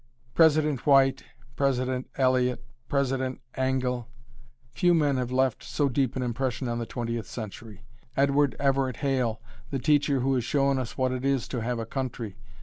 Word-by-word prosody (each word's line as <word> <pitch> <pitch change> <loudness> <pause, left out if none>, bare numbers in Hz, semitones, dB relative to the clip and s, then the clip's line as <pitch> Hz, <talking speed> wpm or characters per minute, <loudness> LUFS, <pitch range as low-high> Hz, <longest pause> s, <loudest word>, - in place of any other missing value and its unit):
President 155 -4 +3
White, 135 -1 +4 0.3
President 130 -2 0
Eliot, 125 -1 +1 0.2
President 130 -2 0
Angell, 130 -2 -1 0.6
few 175 -2 +3
men 145 -4 +2
have 125 -1 -2
left 130 -2 +1
so 145 -2 0
deep 130 -1 0
an 130 - -1
impression 125 +1 -2
on 120 0 -2
the 115 - -4
Twentieth 115 -1 -3
Century. 110 -2 -8 0.3
Edward 140 0 +3
Everett 135 -3 +1
Hale, 125 -5 0 0.3
the 140 - -1
teacher 145 -1 +2
who 135 +2 +1
has 125 -2 +1
shown 140 +1 +1
us 125 -3 -5
what 130 -1 +1
it 130 0 -3
is 135 -2 +1
to 125 - -3
have 120 +2 -1
a 115 - -3
country. 120 -4 -4
130 Hz, 160 wpm, -27 LUFS, 125-140 Hz, 0.6 s, White